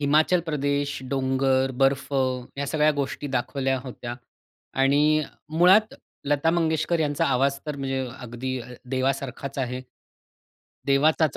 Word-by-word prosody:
हिमाचल 155 +5 +3
प्रदेश, 145 -1 -1
डोंगर, 130 0 +1
बर्फ 135 +1 +2 0.5
या 140 - -1
सगळ्या 155 +1 +3
गोष्टी 145 0 -3
दाखवल्या 135 +1 0
होत्या. 120 -2 -6 0.6
आणि 145 +3 +3 0.4
मुळात 195 +5 +5 0.3
लता 145 +3 +2
मंगेशकर 160 0 +1
यांचा 145 -2 +1
आवाज 135 +1 +2
तर 150 -1 -3
म्हणजे 135 -1 -2
अगदी 125 +1 -4
अ, 115 - -9 0.2
देवासारखाच 135 +1 -2
आहे. 125 0 -2 1.1
देवाचाच 150 +2 +3
140 Hz, 115 wpm, -25 LUFS, 130-150 Hz, 1.1 s, मुळात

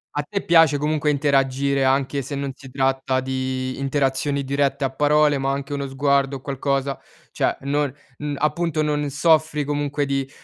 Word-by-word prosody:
A 145 - +1
te 200 -1 -2
piace 165 -4 +5
comunque 150 +1 0
interagire, 140 -1 +1
anche 135 +1 +1
se 140 +2 -6
non 140 0 -3
si 135 -2 -13
tratta 135 0 0
di 130 0 -3
interazioni 140 0 0
dirette 140 +1 0
a 135 - 0
parole, 145 +1 +3
ma 135 0 0
anche 140 +1 -4
uno 140 -1 -3
sguardo 140 0 +1
o 135 - -7
qualcosa 140 0 -2 0.3
cioè - - 0
non 145 0 0 0.3
uhm, 150 -1 -4
appunto 155 +1 0
non 150 -1 -1
soffri 155 +1 +2
comunque 145 0 -1
di 135 -1 -2
140 Hz, 165 wpm, -22 LUFS, 135-145 Hz, 0.3 s, piace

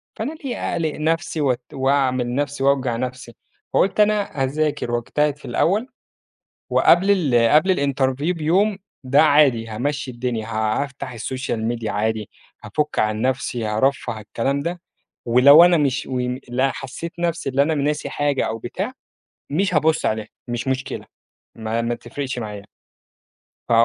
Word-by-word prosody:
فأنا 245 +8 -3
ليه 275 -5 -5 0.2
أقلق 160 -3 -1
نَفسي 160 0 -1
وات 130 -3 +1
وأعمل 130 -2 +1
نَفسي 145 -1 -2
وأوجع 135 -3 +2
نفسي؟ 125 -1 -5 0.4
فقُلت 195 +2 +2
أنا 210 -9 +2
أذاكر 145 -2 -1
واجتهد 145 +5 0
في - - -14
الأول، 210 +9 +1 0.8
وقبل 190 +4 +4
ال 125 - +3
قبل 185 +5 +4
الinterview 140 +2 0
بيوم، 190 +6 +2 0.3
ده 130 +2 +4
عادي 140 -7 +4
هامشّي 130 +4 -3
الدنيا، 120 -2 -3
ه 110 +3 0
هافتح 135 -2 -8
الsocial 130 0 -3
media 115 -2 -4
عادي، 110 0 -1 0.3
هافُك 150 0 -2
عن 110 0 0
نَفسي، 125 -2 -1
هارفّه 110 +1 0
الكلام 120 +6 -2
ده، 170 +3 -4 0.4
ولو 135 +7 +8
أنا 175 -1 +5
مش 140 -3 0
وم 125 0 -2
لأ، 130 +2 +1
حسيّت 140 +5 -7
نَفسي 170 -4 -1
اللي 135 +1 +2
أنا 160 +2 0
ناسي 150 +1 -1
حاجة 145 -2 0
أو 110 - -3
بتاع، 190 - -4 0.6
مش 180 +5 0
هابُصّ 155 +1 +2
عليها، 110 -1 -1 0.2
مش 120 +2 -3
مشكلة، 130 0 -3 0.5
ما 115 +1 -2
ما 120 +1 -1
تفرقش 130 +1 -5
معايا. 105 -3 -6 1.0
ف - - -1
135 Hz, 145 wpm, -21 LUFS, 120-155 Hz, 1.0 s, ولو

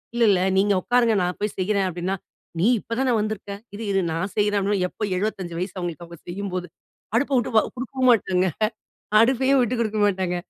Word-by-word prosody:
"இல்ல 235 - +2
இல்ல 185 -2 +3 0.2
நீங்க 200 +1 +3
உட்காருங்க 240 -3 +3
நான் 180 0 -2
போய் 210 0 -2
செய்றேன்" 195 0 +1
அப்படின்னா, 180 +2 -2 0.4
"நீ 195 - +3
இப்ப 230 - -5
தான 255 -3 +2
வந்துருக்க, 210 -1 -3 0.2
இரு 220 - -6
இரு 195 -1 +2
நான் 185 +4 -2
செய்றேன்" 205 -1 +2
அப்படின்னா. 200 -1 0
எப்ப - - -22 0.2
75 190 -4 -3
வயசு 185 - -4
அவங்களுக்கு 175 -1 -5
அவங்க 170 -1 -12
செய்யும்போது. 185 -1 -4 0.5
அடுப்ப 280 +4 +1
விட்டு 240 - 0
அ - - -4
குடுக்கவும் 255 0 0
மாட்டாங்க. 190 -5 +2 0.7
அடுப்பையும் 265 +3 +3
விட்டு 245 +1 0
குடுக்க 215 -1 -1
மாட்டாங்க. 185 -3 0
205 Hz, 185 wpm, -23 LUFS, 185-230 Hz, 0.7 s, இல்ல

